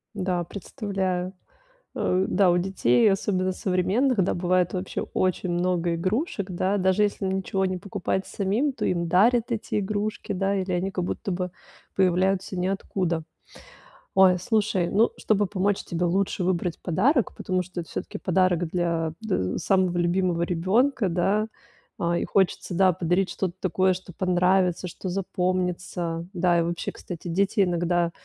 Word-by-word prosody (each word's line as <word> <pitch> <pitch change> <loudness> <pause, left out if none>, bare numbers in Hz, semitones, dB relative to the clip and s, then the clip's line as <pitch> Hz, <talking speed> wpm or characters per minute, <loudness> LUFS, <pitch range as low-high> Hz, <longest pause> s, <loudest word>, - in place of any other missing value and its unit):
Да, 180 -2 -1
представляю. 190 -2 -3 0.6
Э, 185 +1 +1
да, 190 -1 +3
у 175 - +4
детей, 175 - +3
особенно 185 -1 0
современных, 195 +6 +1
да, 180 - 0
бывает 180 0 +1
вообще 185 0 -3
очень 185 -1 0
много 175 -1 0
игрушек, 200 - -2
да. 185 +3 0
Даже 190 +2 +3
если 200 -1 -1
ничего 190 0 -1
не 185 -1 -1
покупать 190 0 -3
самим, 215 +9 0
то - - -3
им 170 -1 0
дарят 230 +7 +3
эти 225 -2 -1
игрушки, 210 +2 -3
да. 195 +1 0
Или 190 -1 -2
они 180 +2 -1
как 180 -2 -2
будто 195 - -3
бы 180 0 -2 0.4
появляются 190 +1 +1
ниоткуда. 180 -2 -1 0.9
Ой, 185 -1 +6
слушай, 200 -2 0
ну, 220 +4 +3
чтобы 205 -2 +1
помочь 195 +1 0
тебе 175 +1 -2
лучше 185 +1 0
выбрать 175 -2 -1
подарок, 230 - +2
потому 185 -1 -1
что 180 0 -6
это 165 - -12
всё-таки - - -5
подарок 180 -1 +2
для 165 -2 -1
дэ 95 - -1
самого 185 -2 +1
любимого 175 0 +1
ребёнка, 195 +6 +1
да. 195 +5 +1 0.5
А, 170 0 +1
и - - -1
хочется, 190 -1 0
да, 190 +1 +5
подарить 180 +2 0
что-то 180 0 -2
такое, 185 +1 +2
что 180 0 -9
понравится, 180 0 +2
что 185 +2 -6
запомнится. 180 -2 -2
Да, 175 -1 +2
и - - +3
вообще, 170 0 -3
кстати, 175 0 -8
дети 195 +4 +1
иногда 175 -1 +1
185 Hz, 150 wpm, -25 LUFS, 175-195 Hz, 0.9 s, Ой